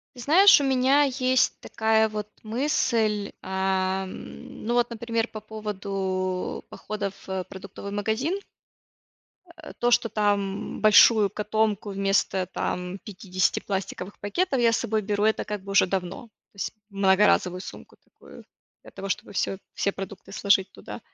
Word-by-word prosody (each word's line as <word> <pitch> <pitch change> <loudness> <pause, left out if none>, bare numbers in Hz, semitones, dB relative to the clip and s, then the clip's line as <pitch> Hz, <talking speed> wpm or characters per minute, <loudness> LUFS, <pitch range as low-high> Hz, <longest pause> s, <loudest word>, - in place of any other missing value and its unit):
Ты 245 - -9
знаешь, 345 +6 +7
у - - 0
меня 270 +2 +4
есть 260 -1 +2
такая 220 0 +2
вот 210 -1 -4 0.2
мысль, 225 -4 0
ам, 190 0 -3
ну 240 - 0
вот, 240 0 +2
например, 230 0 -2
по 215 - -8
поводу 195 -3 -3
походов 205 -2 -5
в 190 -1 -2
продуктовый 195 +1 -9
магазин. 220 - -1 1.2
Э, - - -9
то, 240 - +2
что 235 -1 +3
там 205 -2 -1
большую 215 0 +6
котомку 215 -1 -1
вместо, 195 -1 +1
там, 180 +1 -3
50 185 -2 -1
пластиковых 190 0 -5
пакетов 265 - 0
я 230 -1 +4
с - - +2
собой 220 -2 -1
беру, 205 0 -1
это 220 0 +2
как 210 -2 -5
бы 195 +1 -7
уже 195 - +5
давно, 185 +2 -3
то - - -26 0.2
есть 195 -2 -4 0.2
многоразовую 190 -2 +3
сумку - - -11
такую - - -16 0.4
для - - -14
того, 195 - -6
чтобы - - -3
всё 195 0 -1 0.2
все 200 - 0
продукты 195 0 -8
сложить 200 -1 +2
туда. - - -9
205 Hz, 145 wpm, -25 LUFS, 195-225 Hz, 1.2 s, знаешь